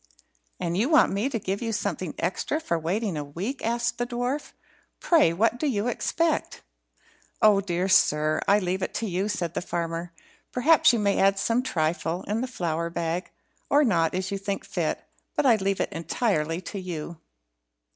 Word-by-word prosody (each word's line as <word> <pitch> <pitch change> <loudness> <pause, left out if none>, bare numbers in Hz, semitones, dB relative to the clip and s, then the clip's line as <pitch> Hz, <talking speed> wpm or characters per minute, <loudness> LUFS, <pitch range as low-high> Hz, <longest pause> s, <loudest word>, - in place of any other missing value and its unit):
"And 170 0 -2
you 225 +9 +1
want 310 - +5
me 205 +7 0
to 255 - -2
give 195 -1 -3
you 230 -1 -2
something 185 -5 -3
extra 190 - -1
for 170 - -1
waiting 190 +4 -1
a 150 - -2
week?" 185 - -5
asked 235 +1 -1
the 240 - -1
dwarf. 245 +4 -3 0.5
"Pray, 325 - +4
what 225 +7 +1
do 305 - 0
you 220 -4 0
expect?" 325 +6 -1 0.8
"Oh, 210 -2 +5
dear 180 -1 -1
sir, 155 -4 +3
I 200 - +6
leave 185 -1 -1
it - - -3
to 230 - -1
you," 190 +2 -1
said 175 -5 -2
the - - -2
farmer. 170 -1 -3 0.4
"Perhaps 295 +4 +5
you 240 - +1
may 200 -2 +1
add 195 0 +4
some 230 +4 +1
trifle 165 -5 -1
in 210 +3 -2
the 255 - -2
flour 170 -8 -2
bag, 170 +1 -3 0.4
or 290 +1 +5
not, 170 - +2
as 185 +1 -2
you 200 - -2
think 200 0 -3
fit - - -2 0.3
but - - +1
I 235 -4 +6
leave 195 -1 -1
it - - -1
entirely 165 -2 -1
to 195 +3 -6
you." 170 -3 -6
195 Hz, 185 wpm, -26 LUFS, 170-235 Hz, 0.8 s, I